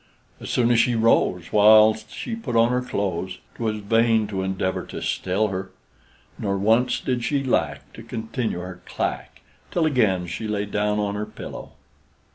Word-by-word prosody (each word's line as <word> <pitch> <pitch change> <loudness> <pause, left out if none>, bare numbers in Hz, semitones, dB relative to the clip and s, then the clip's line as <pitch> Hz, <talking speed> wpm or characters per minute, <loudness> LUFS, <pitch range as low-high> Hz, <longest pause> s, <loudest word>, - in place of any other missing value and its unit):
As - - -8
soon 120 -1 +2
as 120 - +4
she 120 0 +3
rose, 90 -6 +2
while 110 +1 +7
she 110 - -7
put 140 - -5
on 115 +1 +5
her 125 0 +1
clothes, 95 -6 -3 0.2
'Twas 110 -2 -3
vain 115 +1 +3
to 95 -2 -2
endeavor 95 0 -2
to - - -6
still 100 +4 0
her; 95 0 -4 0.7
Nor 100 -1 -1
once 115 +5 +2
did 125 -2 -2
she 140 +3 0
lack 130 - -1
to - - -10
continue 110 -4 -4
her 90 0 -8
clack, - - -4 0.3
Till 170 - +1
again 110 - +2
she 90 +6 -5
lay 105 -1 -1
down 105 +1 0
on 105 -1 -1
her 105 +1 -3
pillow. - - -9
110 Hz, 170 wpm, -23 LUFS, 100-115 Hz, 0.7 s, while